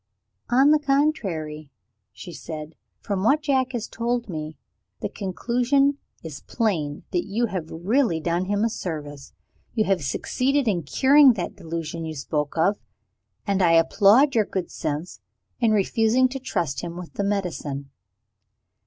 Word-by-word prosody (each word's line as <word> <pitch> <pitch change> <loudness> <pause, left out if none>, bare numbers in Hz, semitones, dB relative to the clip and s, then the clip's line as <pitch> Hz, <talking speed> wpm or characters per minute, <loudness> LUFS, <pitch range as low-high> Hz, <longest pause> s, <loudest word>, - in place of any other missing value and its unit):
"On 270 +4 +5
the 305 - +5
contrary," 200 - -1 0.4
she 170 +10 -10
said, 155 0 -7 0.3
"from 195 -2 -2
what 295 +7 +3
Jack 265 -3 +1
has 235 -3 -3
told 235 0 -2
me, 155 -3 -6 0.4
the - - -2
conclusion 250 +8 0 0.2
is 155 -4 -8
plain 165 -11 -2
that 175 -1 -1
you 220 +4 0
have 185 -7 -4
really 185 - +1
done 170 +3 -1
him 205 +2 0
a 230 - +2
service. 145 -7 -6 0.4
You 220 - +3
have 190 -5 +1
succeeded 265 - 0
in 185 -5 +1
curing 265 - +5
that 180 -6 -4
delusion 165 0 -5
you 160 -1 -5
spoke 150 +2 -3
of 195 +6 +2 0.7
and 195 -1 +1
I 170 -2 +4
applaud 205 - +5
your 220 -3 +3
good 190 -3 -4
sense 150 -1 -4 0.4
in 230 - +3
refusing 225 +4 +3
to 270 +1 -5
trust 175 - -2
him 170 -1 -6
with 180 -2 -9
the 200 - -2
medicine." 165 -9 -3
195 Hz, 150 wpm, -24 LUFS, 160-240 Hz, 0.7 s, On